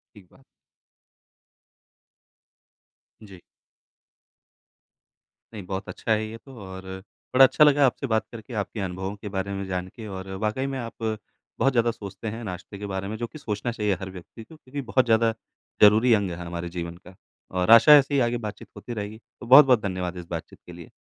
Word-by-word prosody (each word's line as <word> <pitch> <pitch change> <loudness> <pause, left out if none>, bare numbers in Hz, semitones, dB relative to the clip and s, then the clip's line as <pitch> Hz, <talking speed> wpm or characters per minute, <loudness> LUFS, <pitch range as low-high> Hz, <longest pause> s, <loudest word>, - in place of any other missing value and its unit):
ठीक 100 -3 -16
बात। 135 - -22 2.8
जी। 95 -4 -13 2.1
नहीं, 105 - -6
बहुत 95 +1 -5
अच्छा 110 - -2
है 110 0 +1
ये 110 +1 -8
तो 135 +1 -15
और 95 0 -9 0.5
बड़ा 135 +1 +9
अच्छा 150 - +5
लगा 145 -2 +5
आपसे 135 +2 -1
बात 110 -2 0
करके, 115 +1 -10
आपके 105 +1 -3
अनुभवों 95 +1 -4
के 105 0 -8
बारे 100 0 -3
में 100 - -4
जान 90 -1 -3
के 110 -2 -8
और 95 -1 -7 0.2
वाक़ई 130 +6 -1
में 135 -1 -4
आप 115 -2 -6
बहुत 110 +4 -3
ज़्यादा 120 -1 +2
सोचते 110 0 -7
हैं, 115 +2 -6
नाश्ते 95 +1 -7
के 105 - -6
बारे 95 0 -4
में 110 - -4
जो 120 - -3
कि 155 - -12
सोचना 115 -2 -3
चाहिए 105 -3 0
हर 95 -1 -6
व्यक्ति 95 +5 -12
को, 155 - -15
क्योंकि 140 -1 -7
बहुत 130 +2 +2
ज़्यादा 115 -1 +3 0.5
ज़रूरी 110 +4 +6
अंग 100 -4 0
है 85 - -5
हमारे 85 0 -5
जीवन 85 -1 -6
का। 90 +1 -16 0.4
और 90 +3 0
आशा 115 +6 +9
ऐसे 140 +1 0
ही 140 - +3
आगे 120 0 +1
बातचीत 105 -3 -7
होती 120 - -7
रहेगी, 105 +1 -6
तो 120 - -15
बहुत-बहुत 130 -3 +7
धन्यवाद 90 -2 -3
इस 90 - -8
बातचीत 85 -2 -6
के 90 - -10
लिए। 85 -2 -12
105 Hz, 190 wpm, -25 LUFS, 95-120 Hz, 2.8 s, बड़ा